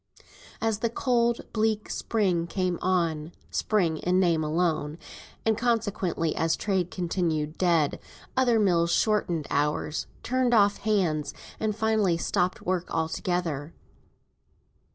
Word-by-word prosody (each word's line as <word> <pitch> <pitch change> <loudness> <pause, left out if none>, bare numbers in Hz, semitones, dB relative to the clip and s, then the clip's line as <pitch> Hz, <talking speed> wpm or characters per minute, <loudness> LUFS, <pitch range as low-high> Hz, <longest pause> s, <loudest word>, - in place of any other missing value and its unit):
As 225 -2 0
the 230 - 0
cold 235 -1 +1
bleak 215 -1 0
spring 185 -7 0
came 180 -1 -1
on 170 -3 0 0.2
(spring, 175 -7 +1
in 180 +3 +1
name 170 -4 +2
alone), 155 -1 0 0.5
and 220 -1 +3
consequently 205 -8 0
as 165 0 +1
trade 190 -4 0
continued 165 -4 -1
dead, 170 -5 +2 0.4
other 245 -3 +3
mills 170 -4 +3
shortened 175 -8 +1
hours, 150 +1 0 0.2
turned 255 -1 +2
off 205 -1 +4
hands, 180 -9 0 0.2
and 215 -1 -1
finally 220 -5 +2
stopped 180 +2 0
work 180 -1 -1
altogether. 160 -2 -2
180 Hz, 115 wpm, -27 LUFS, 165-215 Hz, 0.5 s, off